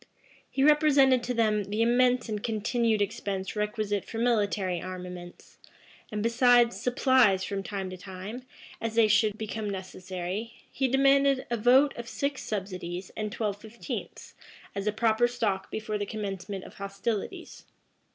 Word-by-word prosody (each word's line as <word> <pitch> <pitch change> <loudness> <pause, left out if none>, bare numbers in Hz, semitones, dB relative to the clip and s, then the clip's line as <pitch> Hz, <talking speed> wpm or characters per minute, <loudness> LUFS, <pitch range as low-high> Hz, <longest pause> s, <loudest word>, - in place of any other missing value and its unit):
He 270 - 0
represented 285 -4 +5
to 250 - -1
them 215 -3 +2
the 210 +3 0
immense 245 +1 +3
and 210 -2 -3
continued 225 0 +1
expense 195 -1 -4
requisite 210 -1 -1
for 225 - -8
military 205 -6 +1
armaments; 180 -1 -9 0.5
and, 210 -1 -2
besides 240 0 +4
supplies 250 -6 +3
from 195 +1 -3
time 195 -1 -5
to 185 - -7
time, 190 +6 -7 0.4
as 225 -1 -3
they 230 -1 +5
should 215 0 +3
become 215 -1 -4
necessary, 185 +2 -5 0.2
he 265 - 0
demanded 275 +1 +3
a - - +2
vote 255 +6 +5
of 235 0 -6
six 280 +2 -2
subsidies 185 -3 -5
and 215 -1 -3
twelve 205 -2 -3
fifteenths, 220 +2 -7 0.4
as 200 +1 -4
a - - +3
proper 225 +2 +2
stock 220 -6 -2
before 215 -1 -3
the 205 - -3
commencement 195 -2 -5
of - - -13
hostilities. 205 - -4
215 Hz, 145 wpm, -28 LUFS, 195-240 Hz, 0.5 s, represented